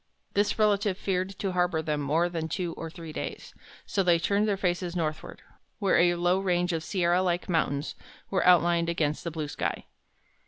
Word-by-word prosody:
This 205 +1 +1
relative 205 -3 +2
feared 190 0 -2
to 195 - -2
harbor 180 -2 +1
them 150 -2 -1
more 155 +5 +2
than 165 -2 -3
two 175 -2 -2
or 165 - -6
three 165 -2 -9
days, - - -6 0.3
so 195 - 0
they 175 -2 +4
turned 200 +5 +1
their 200 -2 +1
faces 180 -2 -1
northward, 155 -3 -4 0.3
where 200 -3 +2
a 175 0 +4
low 175 +2 +2
range 180 -2 +1
of 160 -1 -2
sierra 175 +1 +1
like 175 -1 0
mountains 150 -4 0 0.4
was 190 - +2
outlined 170 -1 +4
against 155 -3 -1
the 170 - -2
blue 155 -2 -4
sky. - - -3
175 Hz, 185 wpm, -28 LUFS, 165-185 Hz, 0.4 s, they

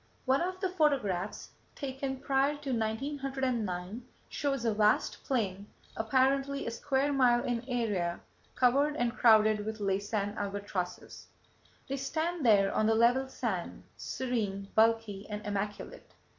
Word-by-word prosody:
One 265 +2 +3
of 370 +1 -2
the 375 -1 0
photographs 280 - 0 0.2
taken 270 -1 -4
prior 275 +2 +2
to 285 -2 -5
1909 235 -4 -2 0.3
shows 275 -4 -2
a 225 - +2
vast 210 0 +2
plain, 205 -6 -1 0.3
apparently 270 +4 +1
a 230 - -2
square 275 +4 0
mile 245 -3 +4
in 240 -1 -2
area, 205 -8 -1 0.4
covered 280 +4 +3
and 240 -4 -1
crowded 215 -3 +5
with 220 +1 -4
Laysan 205 +1 -1
albatrosses. 200 -3 -4 0.6
They 275 - -3
stand 320 +4 -2
there 200 -4 +4
on 215 - +2
the 225 - +3
level 245 +4 +3
sand, 215 -9 -4
serene, 205 -6 -3
bulky 220 -3 +2
and 210 +1 -5
immaculate. 205 0 -5
235 Hz, 130 wpm, -31 LUFS, 205-270 Hz, 0.6 s, crowded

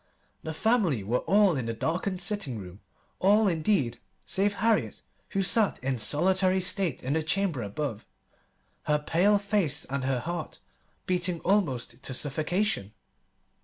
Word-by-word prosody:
The 160 -1 -6
family 190 - +1
were 120 +6 0
all 200 -3 +4
in 125 -4 -3
the 115 - -3
darkened 180 - -2
sitting 185 - -1
room 95 -1 -10 0.4
all, 210 +3 +4
indeed, 155 - +1 0.3
save 205 +1 +1
Harriet, 225 -1 0 0.3
who 195 -1 0
sat 215 +2 +3
in 130 -2 -1
solitary 185 - +2
state 185 -5 +1
in 130 +3 -1
the 160 - +1
chamber 165 -3 0
above, 110 +2 -4 0.8
her 150 - +2
face 195 0 +1
pale 135 - -5
and 140 - -2
her 130 -1 0
heart 170 -2 -5 0.5
beating 180 -1 0
almost 135 - 0
to 130 - -4
suffocation. 155 - -1
170 Hz, 140 wpm, -27 LUFS, 130-195 Hz, 0.8 s, all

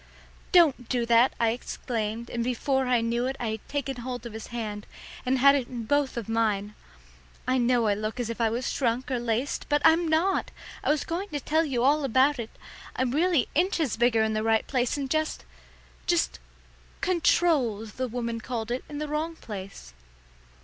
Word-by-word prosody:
"Don't 305 -9 +4
do 245 -2 +1
that!" 235 +2 +4
I 230 - +3
exclaimed, 230 -1 -4
and 235 -1 -1
before 260 +2 0
I 245 -2 +3
knew 235 +2 0
it 265 - -2
I 240 -2 -2
had 220 -1 -6
taken 275 -2 -3
hold 245 0 -5
of 235 - -7
his 220 0 -7
hand, 215 -3 -5 0.4
and 260 +1 +3
had 280 +2 +7
it 270 -4 0
in 240 -2 -5
both 280 +2 0
of 230 - -4
mine. 210 -2 0 0.7
"I 255 0 +2
know 240 -1 +3
I 210 - +3
look 215 +4 -4
as 240 - -1
if 230 +1 -4
I 225 - +3
was 240 +3 -2
shrunk 250 +1 -1
or 250 - 0
laced, 240 +3 -2
but 295 0 +3
I'm 325 +1 +5
not! 335 +5 +1 0.3
I - - 0
was 300 0 +2
going 365 +5 -4
to 295 - -3
tell 315 +4 +1
you 250 -5 -1
all 290 +3 +3
about 270 +2 +3
it. 230 -1 -4 0.5
I'm 255 -1 0
really 325 -1 +2
inches 330 - +1
bigger 230 -1 +3
in 220 0 0
the 215 - 0
right 225 0 +2
place, 250 0 0
and 275 -1 -2
just 310 - -1 0.6
just 60 +1 +1 0.6
'controlled,' 295 - +2
the 255 +5 -3
woman 235 -1 -3
called 235 -2 -4
it, 250 - -2
in 295 - -6
the 300 +1 -3
wrong 310 +3 -2
place." 195 - -9
245 Hz, 195 wpm, -27 LUFS, 225-285 Hz, 0.7 s, had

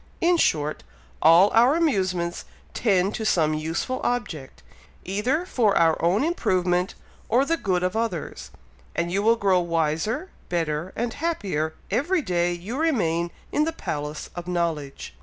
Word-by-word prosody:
In 350 +1 +3
short, 150 - +1 0.4
all 175 +5 +6
our 240 +6 +5
amusements 185 - 0 0.3
tend 195 -3 +2
to 225 - -4
some 160 -7 +2
useful 160 +11 -2
object, 170 - -3 0.4
either 245 - 0
for 225 - +2
our 165 -1 +3
own 185 +8 +3
improvement 185 - 0 0.3
or 255 +4 +3
the 330 - +1
good 185 - -1
of 180 +2 -1
others, 225 -8 -3 0.5
and 170 0 -1
you 195 +2 +1
will 225 +2 +4
grow 195 -4 +2
wiser, 170 - -1 0.2
better, 165 0 -2
and 230 0 -2
happier 190 - -2 0.2
every 310 - +1
day 175 -3 +1
you 190 +10 -5
remain 175 - +1 0.2
in 300 - +2
the 325 - -1
Palace 150 - -5
of 175 0 -6
Knowledge." 165 -6 -3
185 Hz, 145 wpm, -24 LUFS, 170-240 Hz, 0.5 s, all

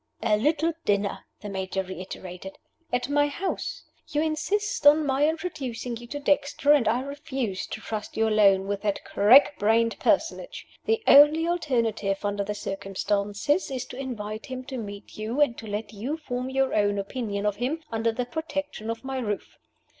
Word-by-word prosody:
"A 215 -2 +4
little 305 +8 +1
dinner," 200 -1 0
the 210 - -6
Major 190 0 -2
reiterated, 185 0 -8 0.3
"at 245 0 0
my 290 +1 +3
house. 355 +6 -4 0.2
You 300 -1 0
insist 320 +3 0
on 300 +1 +7
my 280 +2 +3
introducing 275 -8 -4
you 240 +1 -9
to 290 +4 -5
Dexter, 285 0 +2
and 285 -7 +5
I 235 +3 +2
refuse 270 -7 -4
to - - -6
trust 215 0 -5
you 225 0 +3
alone 200 -3 +4
with 200 0 -2
that 205 -2 -2
crack 255 +8 +6
brained 225 +2 +2
personage. - - 0 0.2
The 450 0 +1
only 300 +3 +7
alternative 230 - 0
under 205 0 0
the 210 +1 -4
circumstances 200 - -1
is 260 -2 -3
to - - -10
invite 225 -2 -5
him 260 -1 -5
to 260 0 -6
meet 205 -2 -8
you, 225 +6 -3
and 285 -5 +4
to 220 - -9
let 210 +1 -4
you 245 +10 -3
form 250 -4 -4
your 265 0 +1
own 205 -1 +2
opinion 200 0 -3
of 205 -1 0
him 280 +8 -2
under 225 0 +1
the 245 +2 -2
protection 290 -5 -4
of 230 +1 -4
my 265 0 -3
roof. 210 -5 -4
240 Hz, 175 wpm, -26 LUFS, 205-290 Hz, 0.3 s, on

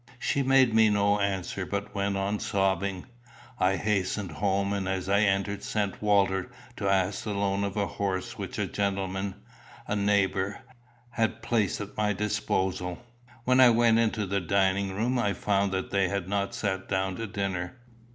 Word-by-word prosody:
She 140 +2 0
made 135 -3 +4
me 110 -1 +5
no 100 0 +2
answer, 100 -1 -2
but 100 +2 -4
went 100 -1 -1
on 100 +2 -1
sobbing. 95 -2 0 0.5
I 95 +1 +3
hastened 95 -1 -1
home, 100 +3 0
and 95 -2 -2
as 95 -1 -2
I 100 +1 +3
entered 100 0 +1
sent 105 -1 -2
Walter 100 -3 +2 0.3
to 100 -1 -1
ask 95 0 +1
the 105 -2 -3
loan 100 0 0
of 100 0 -3
a 100 - +2
horse 95 -2 -3
which - - -6
a - - 0
gentleman, 95 -1 -2 0.5
a 105 - -1
neighbour, 100 -1 +1 0.5
had 115 -1 -1
placed 115 -5 +1
at 105 0 -8
my 105 -1 +1
disposal. 95 -3 -1 0.5
When 130 +1 +3
I 130 -1 +9
went 115 -1 +4
into 110 -2 +1
the 100 0 -1
dining 95 +2 +1
room, 120 +5 0
I 105 -4 +1
found 100 +1 0
that 95 0 -3
they 100 -1 +2
had 100 -3 -2
not 100 0 -1
sat 95 -2 -2
down 95 -1 0
to 115 - -4
dinner. 95 +1 -3
100 Hz, 170 wpm, -28 LUFS, 95-105 Hz, 0.5 s, I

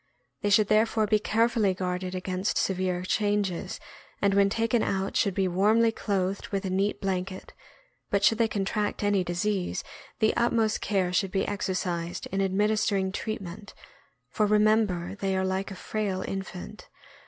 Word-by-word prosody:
They 205 - 0
should 205 0 +5
therefore 220 +1 +3
be 215 0 +2
care 225 +2 +2
fully 215 -6 +1
guarded 185 0 -3
against 185 +2 -2
severe 185 -1 0
changes, 205 -2 -1 0.4
and 200 -1 +2
when 200 0 +4
taken 230 +2 +1
out 195 -1 -1
should 200 -4 +2
be 195 -2 +2
warmly 215 +6 +3
clothed 200 -1 -2
with 200 -3 -3
a 185 - -2
neat 195 +2 0
blanket; 190 -1 -3 0.6
but 200 0 +1
should 225 +2 +4
they 230 - +4
contract 205 0 -2
any 205 -2 +2
disease, 180 +2 -1 0.4
the 220 -2 +3
utmost' 230 -2 +1
care 190 -3 0
should 190 +1 +1
be 195 +1 0
exer 200 -2 -2
cised 175 -2 -3
*in 195 +1 0
administering 200 0 +1
treatment, 200 -2 -6 0.6
for 210 +8 +1
remember 210 -4 +2
they 195 -1 0
are 190 - 0
like 190 +1 -1
a 195 - -7
frail 195 -1 -2
infant. 195 +2 -7
195 Hz, 160 wpm, -27 LUFS, 185-215 Hz, 0.6 s, should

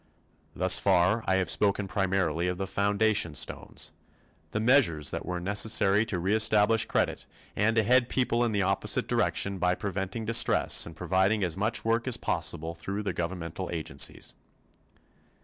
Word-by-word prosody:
Thus - - +4
far 95 +4 +2
I 95 - +2
have 95 -3 -1
spoken 100 -1 0
primarily 90 -3 -1
of 90 0 -3
the 95 - -3
foundation 100 -4 0
stones - - -3 0.6
the 105 - -3
measures 110 - +2
that - - -6
were 90 -1 -3
necessary 105 +2 +1
to 100 - -2
reestablish 105 +3 +2
credit - - -2 0.3
and 110 +2 +1
to 110 - +3
head 125 +2 +2
people 120 -2 0
in 120 - 0
the 100 -2 0
opposite 95 +1 0
direction 100 -1 -1
by 90 0 +1
preventing 95 +3 -5
distress 115 +1 +4
and 80 - -11
providing 95 +5 0
as 85 -3 -2
much 110 +5 -2
work 115 +2 0
as 130 - +2
possible 80 +2 -2
through 95 +5 -6
governmental 85 -1 -5
agencies. 80 -2 -1
100 Hz, 150 wpm, -27 LUFS, 90-110 Hz, 0.6 s, Thus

